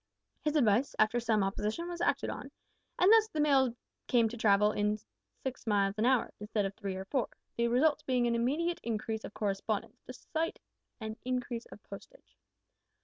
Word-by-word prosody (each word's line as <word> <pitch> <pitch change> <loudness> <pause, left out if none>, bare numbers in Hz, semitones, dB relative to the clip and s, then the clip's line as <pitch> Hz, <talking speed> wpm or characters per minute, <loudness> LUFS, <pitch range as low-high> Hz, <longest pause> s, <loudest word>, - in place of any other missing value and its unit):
His 300 0 0
advice, 245 -1 +3
after 215 +3 +3
some 225 -3 +2
opposition, 210 - -2
was 345 -1 -5
acted - - +1
on, - - -7 0.5
and 370 +3 +5
thus 445 -1 +6
the 320 -8 -5
mails 270 -5 +3 0.3
came 235 -2 +4
to 235 - -7
travel 210 -1 +4 0.7
six 265 -3 -5
miles 200 -2 +2
an 225 - +3
hour, 255 -2 +2
instead 210 0 -1
of 195 - -3
three 200 -2 -5
or 190 0 -5
four 260 +4 -1 0.3
the 235 0 +1
result 290 +5 +3
being 250 -2 +2
an 235 - +2
immediate 295 +9 0
increase 220 -1 -3
of - - -8
correspondence, 205 0 -2
despite 325 0 -3 0.4
an 220 0 -5
increase 250 -2 -3
of - - -13
postage. - - -13
235 Hz, 170 wpm, -32 LUFS, 215-280 Hz, 0.7 s, thus